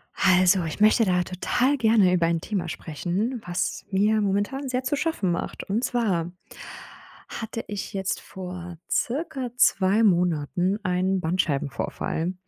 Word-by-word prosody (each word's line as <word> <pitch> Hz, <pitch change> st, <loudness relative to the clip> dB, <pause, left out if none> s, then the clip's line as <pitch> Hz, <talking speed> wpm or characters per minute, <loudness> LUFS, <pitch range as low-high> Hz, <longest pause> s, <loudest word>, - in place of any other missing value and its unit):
Also, 185 Hz, -1 st, +4 dB
ich 160 Hz, +2 st, -5 dB
möchte 215 Hz, +2 st, +5 dB
da 180 Hz, -2 st, +2 dB
total 245 Hz, +10 st, 0 dB
gerne 220 Hz, -6 st, +4 dB
über 175 Hz, -2 st, +3 dB
ein 165 Hz, -1 st, 0 dB
Thema 190 Hz, -3 st, -3 dB
sprechen, 190 Hz, -, -3 dB
was 175 Hz, 0 st, -2 dB
mir 210 Hz, +3 st, +3 dB
momentan 205 Hz, +8 st, -1 dB
sehr 255 Hz, 0 st, -1 dB
zu 275 Hz, +3 st, 0 dB
schaffen 275 Hz, -, -1 dB
macht. 170 Hz, -, -4 dB
Und 215 Hz, +5 st, -2 dB
zwar 190 Hz, -10 st, 0 dB, 1.0 s
hatte 225 Hz, 0 st, -5 dB
ich 205 Hz, -2 st, -5 dB
jetzt 190 Hz, -1 st, -2 dB
vor 180 Hz, -2 st, -8 dB
circa 260 Hz, -2 st, -2 dB
2 200 Hz, -2 st, +4 dB
Monaten 180 Hz, 0 st, +1 dB
einen 185 Hz, 0 st, +1 dB
Bandscheibenvorfall. 160 Hz, +1 st, -1 dB
190 Hz, 135 wpm, -25 LUFS, 175-225 Hz, 1.0 s, möchte